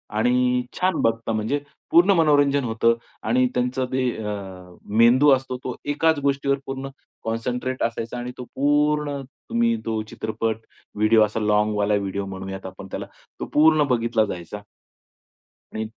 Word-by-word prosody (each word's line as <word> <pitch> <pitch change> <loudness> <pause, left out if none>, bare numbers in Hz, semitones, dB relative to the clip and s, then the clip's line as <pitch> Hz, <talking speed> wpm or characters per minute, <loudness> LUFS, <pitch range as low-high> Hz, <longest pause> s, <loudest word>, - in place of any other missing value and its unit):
आणि 125 +2 +2 0.2
छान 185 -2 +2
बघता 115 0 0
म्हणजे 110 +7 -1 0.3
पूर्ण 175 +4 +6
मनोरंजन 145 -3 +3
होतं 115 0 +2 0.3
आणि 125 +3 +3
त्यांचं 125 +1 0
ते 130 -1 +1 0.2
अ, 95 -3 -7 0.2
मेंदू 125 +5 +6
असतो, 130 -1 -1
तो 125 - -4
एकाच 150 +2 +2
गोष्टीवर 140 0 +1
पूर्ण 135 0 -5 0.3
कॉन्संट्रेट 125 +3 -2
असायचा 115 +1 -3
आणि 120 +1 -5
तो 125 - -6
पूर्ण, 145 0 +1 0.3
तुम्ही 235 0 +2
तो 110 -1 -1
चित्रपट, 110 0 -2 0.4
व्हिडिओ, 110 +1 +4
असा 105 +1 -4
लाँगवॉल 105 -1 +1
व्हिडिओ 100 0 -3
म्हणूयात 95 0 -7
आपण 95 +1 -9
त्याला, - - -4 0.3
तो - - -3
पूर्ण 155 0 +5
बघितला 115 -2 +2
जायचा. 100 +1 -7 1.1
आणि 110 0 -3
125 Hz, 140 wpm, -23 LUFS, 110-140 Hz, 1.1 s, पूर्ण